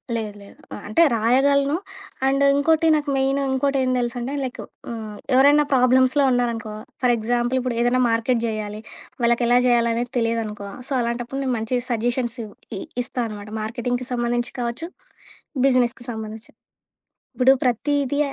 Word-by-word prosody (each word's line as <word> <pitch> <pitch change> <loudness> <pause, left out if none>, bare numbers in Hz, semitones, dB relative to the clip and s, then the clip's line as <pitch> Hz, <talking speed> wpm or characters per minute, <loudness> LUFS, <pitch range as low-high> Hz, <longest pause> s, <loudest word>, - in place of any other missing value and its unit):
లేదు. 215 -2 -3
లేదు. 200 - -15 0.2
ఆహ్, - - -7
అంటే 330 +11 +4
రాయగలను 275 +5 +3 0.5
అండ్ 275 +1 +2
ఇంకోటి 320 +3 +3
నాకు 295 -1 -1
మెయిన్ 270 +1 +1
ఇంకోటేం 265 0 +1
దెలుసంటే 245 +2 -3
లైక్ 255 - -5 0.3
ఆహ్, 220 -2 -6 0.2
ఎవరన్న 285 +3 +6
ప్రాబ్లమ్స్‌లో 260 +2 +4
ఉన్నారనుకో, 235 -3 -1 0.3
ఫర్ 245 - +4
ఎగ్జాంపుల్ 240 +3 0
ఇప్పుడేదైనా 245 0 +1
మార్కెట్ 230 +1 +1
జెయ్యాలి. 215 -1 -4 0.4
వాళ్ళకెలా 235 +1 +3
జేయాలనేది 235 0 +1
తెలియదనుకో, 225 -3 -2 0.2
సో, - - -9
అలాంటప్పుడు 240 +3 -3
నేను 260 -2 0
మంచి 225 +3 -1
సజెషన్స్ 240 +1 -1 0.4
ఇ - - -5 0.2
ఇస్తా 250 - -6
అనమాట 210 -1 -8
మార్కెటింగ్‍కి 245 +3 -3
సంబంధించి 240 0 -1
కావచ్చు, 240 +8 -3 0.8
బిజినెస్‍కి 250 -2 +2
సంబంధించి. 220 0 -7 0.8
ఇప్పుడు 255 +1 +5
ప్రతీది 280 +3 0
245 Hz, 130 wpm, -22 LUFS, 230-265 Hz, 0.8 s, ఎవరన్న